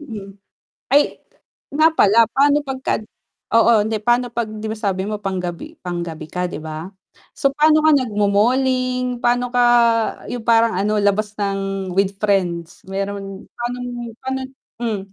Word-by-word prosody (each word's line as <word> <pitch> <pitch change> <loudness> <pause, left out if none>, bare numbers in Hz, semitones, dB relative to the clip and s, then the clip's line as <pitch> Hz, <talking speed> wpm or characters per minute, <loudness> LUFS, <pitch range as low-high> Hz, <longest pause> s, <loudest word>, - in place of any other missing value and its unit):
Mm, 205 -8 -9 0.5
ay 285 +3 +2 0.5
nga 310 +3 +4
pala 225 -4 +5
paano 285 +1 +3
'pagka 265 -1 -2 0.6
oo 230 +1 +6
hindi 220 0 -1
pa'no 240 +2 +2
'pag 235 -2 -2
'di 215 0 -7
ba 220 - -4
sabi 195 -3 -1
mo 210 0 -4
panggabi 190 - -4
panggabi 170 -3 -4
ka 180 0 -2
'di - - -6
ba? 160 +2 -6 0.5
So 275 - +3
pa'no 310 +2 +4
ka 315 - +6
nagmo-malling, 250 +2 +1
pa'no 245 0 +1
ka 245 - +3 0.7
yung 240 -2 -5
parang 230 -1 +4
ano 210 +2 +1
labas 205 +1 +1
ng 195 -2 -2
with 195 +1 +1
friends, 180 -5 -1
meron 195 0 -5
panong 240 -1 -5
pa'no 265 0 -3
t - - -22 0.3
hmm. 225 -4 -1
215 Hz, 145 wpm, -20 LUFS, 195-250 Hz, 0.7 s, oo